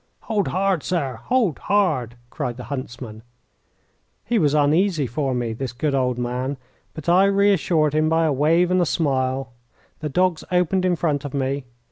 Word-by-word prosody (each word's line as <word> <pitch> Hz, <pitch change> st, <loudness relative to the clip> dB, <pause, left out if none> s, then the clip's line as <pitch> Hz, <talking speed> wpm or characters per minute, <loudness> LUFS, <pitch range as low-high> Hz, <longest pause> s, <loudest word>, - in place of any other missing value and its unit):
"Hold 210 Hz, -3 st, -1 dB
hard, 190 Hz, -2 st, 0 dB
sir! 140 Hz, -10 st, -2 dB
Hold 235 Hz, -, +1 dB
hard!" 155 Hz, -, 0 dB, 0.2 s
cried 120 Hz, -1 st, -4 dB
the 125 Hz, -, -7 dB
huntsman. 120 Hz, -4 st, -7 dB, 1.0 s
He 235 Hz, -1 st, +1 dB
was 150 Hz, -4 st, +2 dB
uneasy 155 Hz, +2 st, +2 dB
for 130 Hz, +2 st, -2 dB
me, 120 Hz, -2 st, -2 dB
this 125 Hz, +1 st, -5 dB
good 140 Hz, +4 st, -1 dB
old 125 Hz, -2 st, +1 dB
man, 125 Hz, +3 st, -2 dB, 0.4 s
but 155 Hz, -1 st, -8 dB
I 180 Hz, +3 st, +5 dB
reassured 195 Hz, -6 st, +2 dB
him 155 Hz, +1 st, +2 dB
by 165 Hz, 0 st, +2 dB
a 155 Hz, -, +2 dB
wave 165 Hz, +6 st, +3 dB
and 185 Hz, 0 st, +3 dB
a -, -, +3 dB
smile. 130 Hz, -4 st, -1 dB, 0.5 s
The 150 Hz, -, -3 dB
dogs 180 Hz, +2 st, +1 dB
opened 180 Hz, +1 st, +2 dB
in 180 Hz, -1 st, +2 dB
front 150 Hz, -4 st, -1 dB
of 145 Hz, -1 st, -6 dB
me. 135 Hz, 0 st, -1 dB
150 Hz, 170 wpm, -22 LUFS, 130-180 Hz, 1.0 s, I